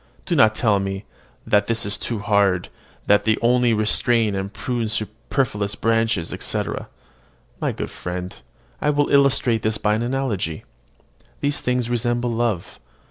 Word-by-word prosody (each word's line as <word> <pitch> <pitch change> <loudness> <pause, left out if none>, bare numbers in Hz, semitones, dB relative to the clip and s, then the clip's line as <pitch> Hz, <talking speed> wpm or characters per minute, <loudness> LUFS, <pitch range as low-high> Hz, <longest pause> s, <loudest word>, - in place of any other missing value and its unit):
Do 175 - 0
not 110 -6 +5
tell 105 -3 +2
me 95 +1 -4 0.4
"that 105 0 +3
this 115 0 -1
is 105 0 0
too 115 - -3
hard, 100 -3 +2 0.4
that 105 0 +4
they 110 0 +2
only 120 0 +3
restrain 110 0 +2
and 95 0 -3
prune 120 -1 -2
superfluous 110 0 -2
branches, 115 -7 0
etc." - - -3 0.7
My - - 0
good - - -5
friend, 90 +1 -5 0.5
I 150 - +2
will 145 -1 +2
illustrate 135 -5 +3
this 110 +1 0
by 105 0 +1
an 110 - 0
analogy. 120 -11 -2 0.8
These 145 0 0
things 125 -1 0
resemble 120 0 0
love. 115 -6 -2
110 Hz, 145 wpm, -22 LUFS, 105-120 Hz, 0.8 s, not